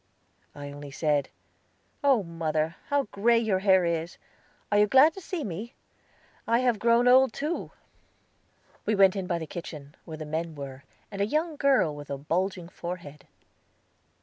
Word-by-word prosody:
I 145 -1 -7
only 145 0 -9
said, 145 -1 0 0.7
"Oh, 270 -7 +4
mother, 160 -1 -2
how 285 -1 +2
gray 230 +4 +3
your 220 -5 +1
hair 190 -2 +4
is! 170 0 -2 0.5
Are 205 - +4
you 210 - +5
glad 270 +8 +6
to 385 - -9
see 345 -3 -4
me? 210 +5 -6 0.7
I 230 - +3
have 245 -3 +1
grown 235 +2 +3
old 260 -1 +6
too!" 305 +5 -3 1.1
We 215 - +1
went 195 -1 +5
in 190 -2 -3
by 175 - 0
the 165 - -5
kitchen, 150 -3 -8
where 160 -1 -7
the 155 - -6
men 160 +1 -3
were, 140 -1 -8 0.3
and 200 -1 -4
a - - +3
young 310 +5 -1
girl 270 - +2
with 145 0 -10
a 140 - -3
bulging 175 +5 -2
forehead. 170 -5 -8
185 Hz, 165 wpm, -27 LUFS, 155-235 Hz, 1.1 s, glad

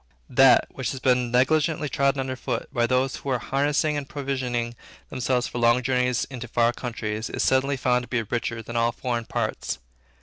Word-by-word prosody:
That, 130 +1 +6
which 130 -5 -3
had 130 - -8
been 125 -2 +3
negligently 150 +5 +2
trodden 140 0 +1
under 130 -1 -3
foot 130 - -4
by 120 -1 +2
those 130 +1 +1
who 140 - -6
were 130 - +2
harnessing 145 +4 0
and 145 -2 -4
provisioning 130 -4 -2 0.4
themselves 125 -1 0
for 120 - -4
long 120 +1 +4
journeys 125 -1 +1
into 125 -2 -7
far 120 +1 +2
countries, 110 -3 -4
is - - -2
suddenly 135 +1 +2
found 125 -1 +2
to 120 - -9
be 120 -2 0
richer 115 +1 -3
than 115 +2 -8
all 115 0 +2
foreign 120 -1 -3
parts. - - -2
125 Hz, 190 wpm, -25 LUFS, 120-135 Hz, 0.4 s, That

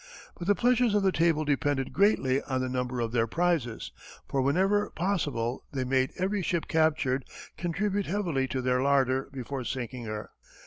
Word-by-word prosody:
But 175 - -7
the 205 - +4
pleasures 245 -2 +3
of 205 - +3
the 190 - +4
table 165 -3 +2
depended 145 -2 0
greatly 140 -10 +3
on 130 -2 -2
the 130 - -1
number 125 0 -2
of 115 -1 -1
their 115 -1 +1
prizes, 165 -5 -1 0.4
for 135 - 0
whenever 190 +9 +2
possible 145 -10 -1
they 135 -3 -2
made 130 0 +1
every 195 +2 0
ship 170 -2 -1
captured 150 -5 +2 0.3
contribute 195 +3 -1
heavily 170 -9 0
to 130 -1 -3
their 125 0 +2
larder 135 -1 +2
before 135 0 -5
sinking 125 0 -4
her. 110 -1 -5
140 Hz, 170 wpm, -28 LUFS, 130-180 Hz, 0.4 s, the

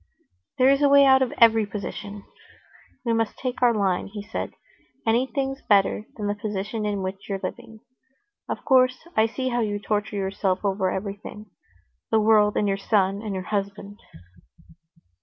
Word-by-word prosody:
"There 260 +1 +5
is 275 +1 +2
a 285 - +5
way 280 0 +7
out 265 0 +6
of 260 - +1
every 225 -1 +6
position. 205 0 -7 0.8
We 230 - +1
must 225 -1 -1
take 255 -1 -4
our 245 -1 +5
line," 195 -5 0
he 205 0 -8
said. - - -5 0.5
"Anything's 265 +4 0
better 205 +1 +2
than 210 - -4
the 205 - 0
position 210 +1 -4
in 200 -2 -2
which 190 +2 -6
you're 195 -1 -2
living. 220 -1 -7 0.7
Of - - -5
course, 255 +3 +3
I 220 +1 +4
see 255 +3 -3
how 240 -1 -1
you 210 -3 -1
torture 205 0 -2
yourself 195 0 -1
over 190 -1 +1
everything—the 190 - -6
world 210 -1 +4
and 205 - +1
your 195 0 0
son 195 -1 +1
and 210 -3 -4
your 185 - -4
husband." 200 +1 -4
210 Hz, 160 wpm, -24 LUFS, 200-230 Hz, 0.8 s, way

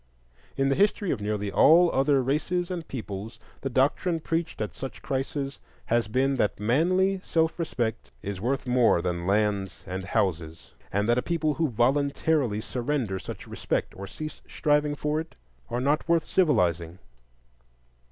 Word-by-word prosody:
In 135 0 +2
the - - +3
history 205 0 +2
of 115 - -2
nearly 105 -1 -2
all 170 - +6
other 135 0 +3
races 170 +7 -1
and 170 -3 -4
peoples 110 -3 -6 0.2
the 135 - -2
doctrine 145 +7 +1
preached 165 +1 -2
at 105 -1 -3
such 135 - -7
crises 135 0 -3 0.3
has 115 -1 +1
been 135 +5 +1
that 105 -5 0
manly 185 - +2
self 160 +1 0
respect 115 -8 -2
is 100 -2 -4
worth 130 +4 -1
more 125 -8 +3
than 85 -1 -2
lands 100 -2 0
and 95 0 -5
houses, 80 -4 -2 0.2
and 100 +2 0
that 120 +1 +3
a - - 0
people 160 -1 0
who 160 0 0
voluntarily 135 -1 +1
surrender 120 -5 -2
such - - -8
respect, - - -2
or 100 +1 -7
cease 155 +8 -7
striving 150 0 +1
for 150 +1 -1
it, 160 +1 -7 0.3
are 120 - -1
not 145 +5 0
worth 170 -1 +3
civilizing. 90 - +1
135 Hz, 155 wpm, -27 LUFS, 105-155 Hz, 0.3 s, all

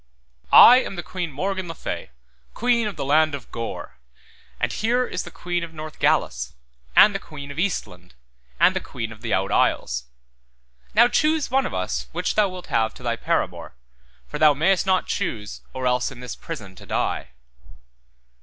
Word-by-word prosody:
I 250 - +10
am 255 - -2
the 175 - -5
Queen 175 -1 -4
Morgan 190 +5 -3
le 165 - -6
Fay, - - -5 0.5
queen 235 -2 +2
of 205 - -5
the 145 - -4
land 155 +1 +3
of 135 - -11
Gore, 90 - -6 0.6
and - - 0
here 245 +3 +1
is 180 - -4
the - - -8
queen 175 -1 -3
of 165 -1 -8
Northgalis, 155 0 -1 0.4
and 210 - +8
the 195 - -2
queen 145 -5 -9
of 140 - -7
Eastland, 90 - -3 0.4
and - - +5
the - - +1
queen 115 -3 -6
of 110 0 -12
the 115 -2 -4
Out 95 +1 +1
Isles; - - +1 0.9
now 235 +3 +7
choose 305 +2 +1
one 265 0 +2
of - - -6
us 65 -9 -2
which - - -1
thou 210 -2 +3
wilt 185 -1 -8
have 110 -1 0
to - - -13
thy 120 -1 0
paramour, 90 - -2 0.5
for - - -6
thou 150 -2 +6
mayest 185 +6 +2
not 185 -2 +2
choose 105 -2 -3
or 130 0 -5
else 125 0 +1
in 135 - -12
this 125 -1 -6
prison 110 - -8
to - - -13
die. - - -1
155 Hz, 180 wpm, -23 LUFS, 115-195 Hz, 0.9 s, I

